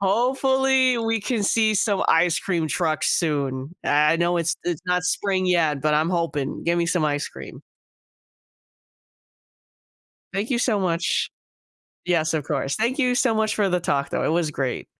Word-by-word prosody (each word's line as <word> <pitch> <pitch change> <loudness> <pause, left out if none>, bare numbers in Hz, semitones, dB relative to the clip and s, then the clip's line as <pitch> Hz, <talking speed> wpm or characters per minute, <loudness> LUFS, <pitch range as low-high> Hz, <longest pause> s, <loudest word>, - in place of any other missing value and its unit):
Hopefully, 260 +4 +2
we 225 -1 -1
can 225 0 -2
see 215 +1 +2
some 200 0 +1
ice 165 +1 +3
cream 170 -4 -2
trucks 155 +2 0
soon. 140 -1 -2
I 150 +2 +3
know 175 +1 +1
it's 170 -1 0
it's 175 -2 -3
not 180 0 +1
spring 190 -1 0
yet, 160 -6 +1
but 150 +1 +1
I'm 155 +3 +1
hoping. 165 -6 -2
Gimme 170 0 +1
some 175 -2 0
ice 145 -1 -1
cream. - - -11 2.7
Thank 200 +5 -3
you 240 - +1
so 225 -4 +1
much. 175 -2 0 0.8
Yes, 160 -3 +1
of 155 -3 -1
course. 140 -1 -2
Thank 240 +6 -1
you 250 -2 +2
so 245 -3 +2
much 220 0 0
for 205 -2 +1
the 180 0 +1
talk 140 -5 -1
though. - - -2
It - - 0
was 160 -1 0
great. 135 -4 -3
175 Hz, 165 wpm, -23 LUFS, 155-215 Hz, 2.7 s, ice